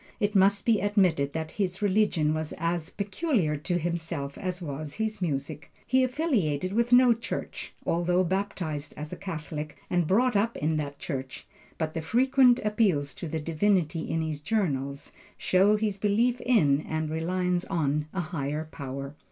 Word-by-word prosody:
It 205 Hz, -2 st, +1 dB
must 195 Hz, 0 st, +4 dB
be 225 Hz, -3 st, +3 dB
admitted 180 Hz, -9 st, +2 dB
that 160 Hz, -1 st, -3 dB
his 185 Hz, -1 st, 0 dB
religion 195 Hz, -7 st, +2 dB
was 155 Hz, -1 st, -3 dB
as 165 Hz, 0 st, -1 dB
peculiar 200 Hz, -, 0 dB
to 175 Hz, +4 st, -1 dB
himself 165 Hz, -4 st, -3 dB
as 185 Hz, -2 st, -3 dB
was 150 Hz, -3 st, -6 dB
his 220 Hz, -2 st, -2 dB
music. 150 Hz, -2 st, -3 dB
He 260 Hz, 0 st, +3 dB
affiliated 220 Hz, -, 0 dB
with 235 Hz, +2 st, +1 dB
no 245 Hz, -1 st, +7 dB
church, 230 Hz, 0 st, -5 dB
although 175 Hz, +2 st, +2 dB
baptized 180 Hz, -5 st, -3 dB
as 150 Hz, +1 st, -6 dB
a -, -, -3 dB
Catholic, 155 Hz, -5 st, -6 dB
and 175 Hz, -3 st, +2 dB
brought 240 Hz, +6 st, +3 dB
up 220 Hz, +3 st, +1 dB
in 155 Hz, +1 st, 0 dB
that 145 Hz, -2 st, -4 dB
church; 135 Hz, -3 st, -5 dB, 0.3 s
but 160 Hz, -1 st, -2 dB
the 165 Hz, -, -3 dB
frequent 250 Hz, -, +4 dB
appeals 195 Hz, -10 st, +1 dB
to 170 Hz, -, -6 dB
the 160 Hz, +1 st, -3 dB
Divinity 165 Hz, 0 st, 0 dB
in 160 Hz, 0 st, 0 dB
his 155 Hz, -2 st, -4 dB
journals, 140 Hz, -8 st, -1 dB, 0.3 s
show 195 Hz, +3 st, +4 dB
his 210 Hz, -2 st, -1 dB
belief 230 Hz, +5 st, +2 dB
in, 150 Hz, -, +3 dB
and 155 Hz, -1 st, -2 dB
reliance 180 Hz, +2 st, 0 dB
on, 150 Hz, -4 st, 0 dB
a 190 Hz, -, -2 dB
higher 155 Hz, -2 st, -3 dB
power. 140 Hz, 0 st, -6 dB
175 Hz, 160 wpm, -27 LUFS, 155-205 Hz, 0.3 s, no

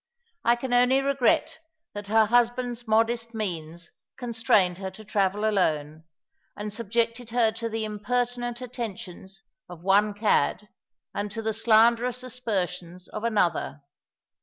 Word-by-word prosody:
I 235 Hz, -, +4 dB
can 245 Hz, +1 st, -4 dB
only 250 Hz, +2 st, +5 dB
regret 275 Hz, +4 st, +1 dB, 0.3 s
that 205 Hz, 0 st, -7 dB
her 220 Hz, +1 st, +4 dB
husband's 240 Hz, +1 st, +1 dB
modest 230 Hz, +1 st, +1 dB
means 170 Hz, -5 st, -4 dB, 0.3 s
constrained 220 Hz, -7 st, +2 dB
her 190 Hz, -1 st, -4 dB
to 215 Hz, +3 st, -13 dB
travel 200 Hz, +1 st, 0 dB
alone, 160 Hz, -6 st, 0 dB, 0.5 s
and 210 Hz, 0 st, -5 dB
subjected 230 Hz, +2 st, -1 dB
her 230 Hz, -1 st, +3 dB
to 230 Hz, +1 st, -4 dB
the 220 Hz, 0 st, -2 dB
impertinent 240 Hz, +3 st, -2 dB
attentions 195 Hz, -6 st, -7 dB, 0.3 s
of 175 Hz, -1 st, -11 dB
one 200 Hz, +2 st, +3 dB
cad 210 Hz, -1 st, +1 dB, 0.4 s
and 205 Hz, +1 st, -3 dB
to 225 Hz, +2 st, -5 dB
the 220 Hz, 0 st, 0 dB
slanderous 235 Hz, +3 st, +3 dB
aspersions 185 Hz, -8 st, -4 dB
of 215 Hz, -, -6 dB
another. 180 Hz, -9 st, 0 dB
220 Hz, 130 wpm, -26 LUFS, 195-240 Hz, 0.5 s, only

